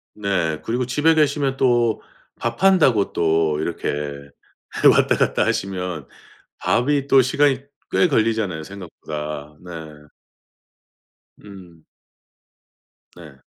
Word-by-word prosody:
네. 90 -7 -1
그리고 120 +2 -1
집에 150 +6 +2
계시면 140 -3 +1
또 120 -3 +2 0.3
밥 115 +8 -4
한다고 150 - +4
또 80 -2 +1
이렇게 75 -3 -3 0.8
왔다 - - +3
갔다 - - +1
하시면 90 -6 -3 0.5
밥이 140 +3 +1
또 135 -1 +6
시간이 135 +1 +2 0.3
꽤 180 - +3
걸리잖아요 110 - 0
생각보다. 75 -5 -7
네. 90 - -10 1.7
음. 90 -5 -14 1.3
네. 75 -6 -14
100 Hz, 195 characters per minute, -21 LUFS, 80-130 Hz, 1.7 s, 또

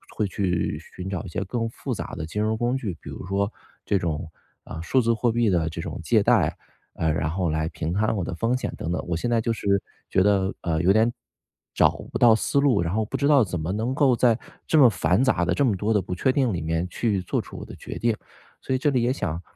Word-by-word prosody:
会 110 - +1
去 90 -5 -1 0.2
寻 90 +1 -5
找 95 -4 -3
一 - - -8
些 100 - -3
更 115 +3 -2
复 - - -5
杂 - - -5
的 80 - -4
金 105 +7 -3
融 110 +1 0
工 120 +3 0
具， 100 -10 -4
比 - - -9
如 - - -7
说 100 +2 0 0.3
这 100 - +2
种， 80 -2 -3 0.3
嗯， 80 - -7
数 130 +9 +2
字 115 0 +2
货 115 +1 +1
币 115 -1 +2
的 85 -3 +1
这 80 - -5
种 - - -6
借 - - +3
贷， - - +3 0.4
呃， 80 -1 0
然 80 0 -1
后 90 0 -1
来 80 0 0
平 80 +2 -3
摊 110 +3 +1
我 90 - -1
的 - - -4
风 115 +6 +1
险 - - -4
等 85 - -3
等。 90 - -2
我 85 - -1
现 120 +9 -2
在 115 - +3
就 115 +1 0
是 100 -3 +1 0.3
觉 95 - +3
得， 100 -1 +2
呃， 80 -2 0
有 95 - +4
点 110 +3 +4 0.6
找 - - +5 0.2
不 - - -1
到 115 -2 +6
思 140 - +1
路， 140 -9 +3
然 85 +1 -1
后 110 +1 +1
不 - - -6
知 140 - +1
道 145 -4 +6
怎 90 -4 -3
么 80 +3 -2
能 110 +6 -1
够 135 -4 +4
在 120 -2 +3 0.3
这 160 - +3
么 130 - +8
繁 90 +3 +1
杂 130 - +2
的， - - +1
这 145 - +1
么 110 -7 +2
多 105 +4 0
的 105 - +3
不 90 0 -5
确 130 +8 +2
定 130 -4 +1
里 85 - -2
面 80 +2 -1
去 105 -1 0
做 90 - -1
出 - - -11
我 - - -7
的 - - -10
决 - - -7
定。 115 -1 +1 0.5
所 130 - -1
以 - - 0
这 145 - +2
里 130 -4 +1
也 125 +2 +2
想 85 - -3
105 Hz, 285 characters per minute, -25 LUFS, 85-120 Hz, 0.6 s, 么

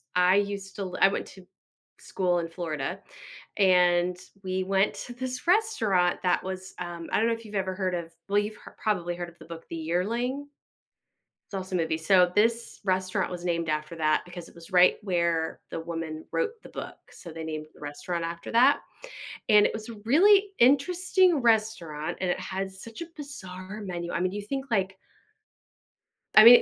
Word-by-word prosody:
I 180 +1 +5
used 200 -1 -1
to 195 - -3
li 180 - -6
I - - +9
went - - -3
to 190 -2 -14 0.5
school 180 -2 0
in 165 - -3
Florida, 160 -5 -4 0.6
and 180 -2 +4 0.3
we 185 0 -1
went 195 +2 +2
to 245 - -7
this 255 +2 -5
restaurant 220 - +2
that 180 - +2
was, 190 0 -6
um 175 -2 -6
I - - +2
don't 225 - +3
know 230 - +2
if 230 0 -7
you've 210 - -9
ever 190 -1 -1
heard 185 -1 -1
of 170 -1 -5 0.2
well, 200 +1 +1
you've 210 +1 -3
hear - - -14
probably 175 -5 0
heard 175 0 -5
of 170 - -21
the - - -12
book, 165 -1 -9
The - - -5
Yearling? 230 - -1 1.0
It's - - -5
also 185 0 -4
movie, 160 -2 0
so 180 +2 +4
this 230 +2 +1
restaurant 185 0 0
was 175 -1 -6
named 170 -2 -1
after 155 +2 -2
that 155 -1 +2
because 175 -1 -9
it - - -18
was 170 +2 -13
right 180 0 +6
where 170 -4 0
the - - -4
woman 165 -1 -5
wrote 470 -2 0
the - - -11
book, - - -7
so 170 - -11
they 165 0 -7
named 155 -1 -4
the - - -19
restaurant 165 +4 -4
after 170 +4 -5
that, 255 +5 +6 0.7
and 210 -1 +7
it - - -4
was 220 0 -6
a 230 - -7
really 390 - +6
interesting 345 +6 +4
restaurant 215 - 0
and 185 -1 0
it - - -2
had 190 +1 -4
such 225 - -9
a 335 - -11
bizarre 195 - -8
menu, 175 -1 -4
I - - -1
mean, 185 - +1
you 205 +1 -4
think, 270 +6 -4
like 190 -2 0 1.4
I 215 - +11
mean, 240 +2 +11
185 Hz, 190 wpm, -27 LUFS, 170-220 Hz, 1.4 s, I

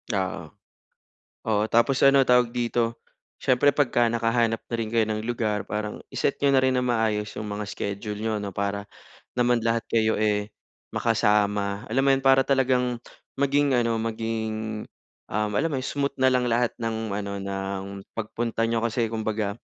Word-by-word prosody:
Oo. 95 -1 -2 1.1
Oo, 105 -1 +2
tapos 120 +4 +4
ano 140 0 +7
tawag 125 -2 +4
dito? 120 -1 -1 0.4
Siyempre 130 +3 +3
pagka 130 -4 +2
nakahanap 115 -1 +1
na - - -4
rin 115 -1 -3
kayo 115 -2 +2
ng 110 0 -2
lugar 110 -3 -1
parang 105 0 -4
i-set - - 0
niyo 140 -1 +2
na 135 - +5
rin 130 0 +2
ng 125 - +1
maayos 110 -3 0
'yong 105 - -6
mga 105 +1 -4
schedule 100 +1 -5
niyo 110 0 -1
ano, 100 -1 -4
para 100 +1 -2 0.5
naman 120 -2 +1
lahat 115 0 +2
kayo, 110 -2 +2
eh, 105 -1 0 0.4
makasama. 105 -1 +1
Alam 130 +5 +1
mo 140 - +4
yun, 135 - +2
para 135 0 +6
talagang 125 -3 +1 0.4
maging 140 0 +3
ano, 115 -2 +2
maging, 110 -1 -3 0.5
um, 105 0 0
alam 155 +9 +2
mo - - 0
yun, 130 - -5
smooth 140 -1 0
na 130 - +5
lang 125 -1 +2
lahat 120 +1 +1
ng 115 -1 -3
ano, 100 0 -3
ng 95 0 -4 0.3
pagpunta 115 +1 -3
niyo 115 0 0
kasi 115 0 0
kumbaga 110 -2 -2
115 Hz, 170 wpm, -25 LUFS, 105-125 Hz, 1.1 s, ano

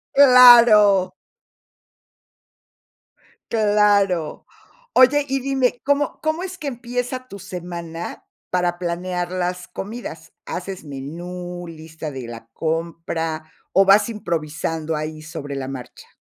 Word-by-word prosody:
¡Claro! 235 -8 +8 2.4
Claro. 205 -6 +2 0.5
Oye, 280 +3 +5
y 270 0 0
dime, 260 -2 0
¿cómo? 285 +1 0
¿Cómo 315 +2 0
es 370 0 -6
que 300 -6 -6
empieza 245 +1 -4
tu 200 - -9
semana, 170 -2 -7 0.3
para 175 -1 0
planear 175 0 -3
las 180 0 -3
comidas? 225 +5 -8
¿Haces 195 -2 -6
menú, 175 +5 -7
lista 160 -1 -8
de 130 -3 -7
la 115 -1 -9
compra, 165 0 -3 0.2
o 195 - +5
vas 200 +4 +5
improvisando 165 -5 -3
ahí 155 0 -5
sobre 155 -3 -7
la 130 -1 -4
marcha? 130 -2 -9
180 Hz, 105 wpm, -21 LUFS, 160-235 Hz, 2.4 s, Claro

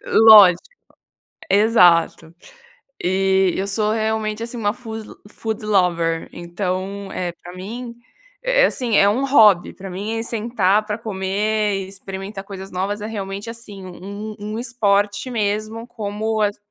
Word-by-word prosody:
lógico 210 -5 +8 0.9
exato. 180 -6 +4 0.7
E 190 0 +2
eu 195 - -2
sou 210 +1 0
realmente 220 0 -1
assim 235 +1 -6
uma 205 -2 0
food 225 -3 -8 0.2
foodlover 180 -7 -1
então 185 +3 -4
é 180 -1 -3
pra 175 +1 -13
mim, 235 +6 -7 0.5
é - - +3
é, - - +7
assim, 235 -5 -1
é 200 - +5
um 255 +6 0
hobby 215 -10 +5
pra 195 0 -9
mim, 205 +5 -4
é 225 - -3
sentar 215 -3 0
pra 210 -1 -3
comer 210 0 -1
e 195 -1 -4
experimentar 195 +1 -7
coisas 195 -1 -9
novas 195 +3 -3
é 210 - -4
realmente 200 0 -5
assim 210 -5 -8
um 200 +4 -8
um 210 +1 -5
esporte 205 -2 0
mesmo 215 +1 -2
como 215 -1 -3
as 205 0 0
205 Hz, 140 wpm, -20 LUFS, 190-220 Hz, 0.9 s, lógico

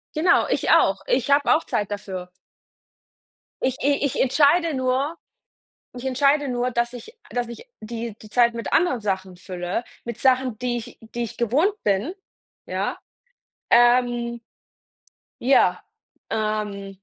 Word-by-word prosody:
Genau, 345 +3 +4
ich - - 0
auch. - - +4
Ich - - +1
habe 285 +2 +5
auch 325 - 0
Zeit 205 -1 -2
dafür. 190 -3 -6 1.3
Ich 260 0 0
i 285 0 +2
ich 270 - -2
entscheide 305 +5 +3
nur 265 +5 0 0.8
ich 250 +1 -6
entscheide 280 +2 +2
nur, 245 0 -1
dass 235 0 -1
ich 445 - -10 0.2
dass 245 -1 -2
ich, 235 - -10
die 230 0 -5
die 215 - -13
Zeit 235 0 +3
mit 230 - -5
anderen 295 -9 +2
Sachen 190 -2 -2
fülle, 180 +4 -4 0.2
mit 235 -2 -6
Sachen, 255 -3 +2
die 245 -1 -1
ich 240 +1 -10
die 230 +1 -6
ich 225 - -8
gewohnt 280 - +2
bin, 210 - 0 0.5
ja, - - -2 0.7
ähm 240 0 +3 1.0
ja, 240 -8 +4 0.5
ähm. 210 -2 -2
240 Hz, 135 wpm, -23 LUFS, 215-270 Hz, 1.3 s, habe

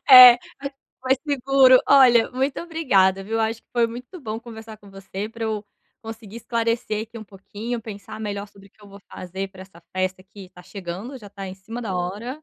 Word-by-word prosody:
É, 250 -2 +12 0.2
mai 280 - -4 0.3
mais 260 0 +3
seguro. 270 -2 +5
Olha, 250 -4 +6
muito 265 +2 -1
obrigada 200 - +2
viu, 220 +3 -5
eu 225 - +1
acho 225 +1 -1
que - - -50
foi 235 -1 +3
muito 250 +9 -9
bom 220 -4 -4
conversar 225 -2 -10
com 200 -1 -16
você 195 +1 -6
pra 225 0 -6
eu, 215 -1 -3 0.4
conseguir 225 -1 -9
esclarecer 230 -2 -1
aqui 230 +1 -10
um 220 - -9
pouquinho, 210 +4 -6
pensar 215 0 -9
melhor 205 -1 -4
sobre 200 -1 -18
que 210 - -26
eu 205 - -14
vou 200 0 -13
fazer 190 +2 -6
pra 190 -1 -12
essa 180 -3 -17
festa 185 0 -1
que 190 -1 -13
tá 180 - -15
chegando, 195 +8 -7
já 205 -4 -12
tá 195 -1 -7
em 185 - -7
cima 220 +5 -8
da 210 -6 -4
hora, 210 +11 -4
220 Hz, 210 wpm, -23 LUFS, 195-240 Hz, 0.4 s, É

